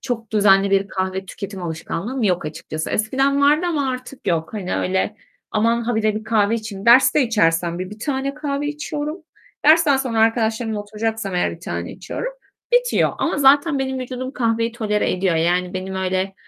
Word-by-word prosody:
çok 230 -4 -4
düzenli 200 -2 +4
bir 195 0 +2
kahve 190 0 -3
tüketim 195 -1 -7
alışkanlığım 175 +9 -4
yok 180 -6 +1
açıkçası. 155 +1 -5
Eskiden 270 +6 +1
vardı 300 +5 +4
ama 285 -5 0
artık 255 +1 -8
yok. 165 +2 -1
Hani, 195 -4 -3
öyle, 190 +3 -1 0.3
"Aman, 230 +2 +1
ha 240 +1 -1
bire 215 -1 +1
bir 215 +1 -5
kahve 215 -1 +2
içeyim" 215 -2 -6
Derste 260 +4 +6
içersem 170 -7 +1
bir 185 +1 -5
1 210 - -10
tane 275 +2 -2
kahve 290 -1 -3
içiyorum. 300 +2 -4 0.4
Dersten 310 -2 +6
sonra 250 -4 -2
arkadaşlarımla 225 -1 +1
oturacaksam 210 -1 -3
eğer 180 - +1
1 - - -16
tane - - -5
içiyorum. - - -5 0.4
Bitiyor. - - +3
Ama - - 0
zaten 285 +2 +4
benim 265 -1 -2
vücudum 255 +1 -5
kahveyi 230 -2 0
tolere 210 -3 0
ediyor. 185 -2 +1
Yani, 180 +3 +1
benim 190 +1 -4
öyle, 190 +1 -1
225 Hz, 170 wpm, -21 LUFS, 190-265 Hz, 0.4 s, Derste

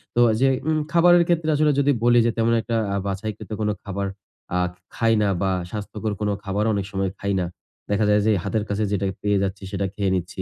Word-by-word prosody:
তো - - +2 0.2
যে 135 - +5 0.2
উম 155 0 +2
খাবারের 175 0 +6
ক্ষেত্রে 165 -2 +1
আসলে 150 0 +3
যদি 140 0 +3
বলি 120 0 +5
যে 120 - +3
তেমন 115 0 +2
একটা 115 - -3 0.2
আ - - 0
বাছাই 100 +2 -2
কৃত - - -11 0.3
খাবার 100 0 -3 0.5
আ - - +2 0.4
খাই 115 0 +2
না 105 - +2
বা 95 -1 +1 0.2
স্বাস্থ্যকর 105 +1 -4
কোনো 105 -1 +1
খাবারও 105 +2 0
অনেক 100 -2 -1
সময় 95 -1 -1
খাই 100 0 -1
না। 90 - 0 0.5
দেখা 105 +1 +2
যায় 105 0 +4
যে 110 - +4
হাতের 110 -2 -1
কাছে 105 +1 0
যেটা 100 -1 0 0.2
পেয়ে 105 -1 +2
যাচ্ছি 100 +1 -3
সেটা 100 -1 -1
খেয়ে 100 -2 0
নিচ্ছি। 90 +1 -4
105 Hz, 215 wpm, -23 LUFS, 100-115 Hz, 0.5 s, খাবারের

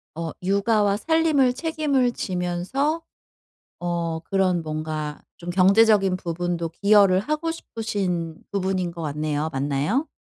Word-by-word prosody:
어 165 -1 -4
육아와 200 +1 +2
살림을 310 -2 +2
책임을 290 -4 0
지면서 190 - -2 0.8
어 170 -2 -2
그런 185 0 0
뭔가 155 -1 -4 0.2
좀 175 0 -8
경제적인 195 +1 +4
부분도 170 -1 -3
기여를 200 +1 +4
하고 305 +9 -2
싶으신 190 - -3
부분인 190 -2 -1
것 170 0 -8
같네요. 150 0 -2
맞나요? 145 - 0
185 Hz, 260 characters per minute, -24 LUFS, 165-225 Hz, 0.8 s, 경제적인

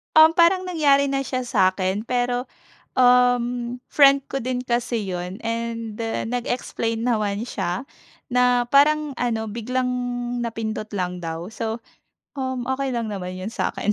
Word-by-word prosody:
Um, 315 +1 +9
parang 360 +2 +4
nangyari 285 -6 +3
na 275 - +1
siya 255 -1 -2
sa'kin 190 -2 +1
pero 245 0 0 0.5
uhm, 245 -1 +3
friend 275 -1 +5
ko 270 - -4
din 250 0 -2
kasi 235 -3 -1
yun 180 +2 -4
and 230 -1 -3 0.3
nag-explain 230 -2 -2
naman 215 -2 0
siya 190 +3 -3 0.5
na 250 0 +3
parang 295 +2 +4
ano 225 -2 -1
biglang 250 +4 -2 0.6
napindot 220 -2 -4
lang 180 -2 -2
daw, 165 +1 -4
so 225 +1 -4 0.6
uhm, 260 -2 -3
okey 265 +1 -1
lang 235 -2 -2
naman 185 -2 -5
yun 190 +4 -5
sa'kin. 210 -2 -1
240 Hz, 135 wpm, -23 LUFS, 215-255 Hz, 0.6 s, Um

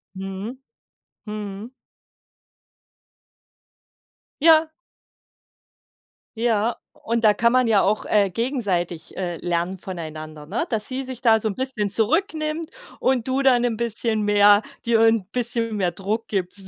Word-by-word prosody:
Mhm, 195 +6 -6 0.7
mhm. 210 +1 -6 2.7
Ja. 320 0 +6 1.7
Ja, 230 0 +1 0.2
und 230 0 -3
da 215 - +6
kann 235 +3 +2
man 255 -1 +4
ja 215 -3 +4
auch, 210 +2 0
äh, 205 -2 +2
gegenseitig, 190 - -2
äh, 175 -3 -3
lernen 175 +2 -2
voneinander, 155 -4 -7
ne? 220 - -2
Dass 220 -3 -2
sie 260 +1 -3
sich 255 -2 -7
da 225 -3 +5
so 220 - -1
'n 200 - -3
bisschen 255 -6 0
zurücknimmt 310 - 0 0.3
und 255 -3 +1
du 265 +1 0
dann 245 -3 +3
bisschen 225 -1 -1
mehr 205 0 +5 0.2
dir 230 -1 +3
'n 225 -3 +4
bisschen 230 -2 -1
mehr 180 -3 +1
Druck 215 +3 -3
gibst. 190 -1 -3
220 Hz, 125 wpm, -23 LUFS, 195-245 Hz, 2.7 s, Ja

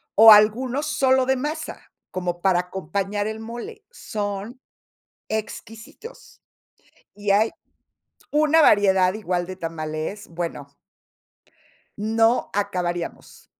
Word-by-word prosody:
o 220 +1 +10
algunos 240 +7 +4
solo 265 -3 +2
de 265 +1 +2
masa, 300 +4 -5 0.2
como 175 -1 -3
para 185 -2 +3
acompañar 195 +3 -3
el 220 0 -5
mole. 240 - -8
Son 210 - -5 0.7
exquisitos. 225 - -8 0.7
Y 205 0 -4
hay 210 +3 +4 0.8
una 310 +2 +4
variedad 190 -7 +4
igual 180 -4 -2
de 185 +1 -7
tamales, 165 +3 -5
bueno 165 -4 -6 1.2
no 225 +3 +2
acabaríamos. 180 -4 -4
210 Hz, 95 wpm, -23 LUFS, 185-240 Hz, 1.2 s, o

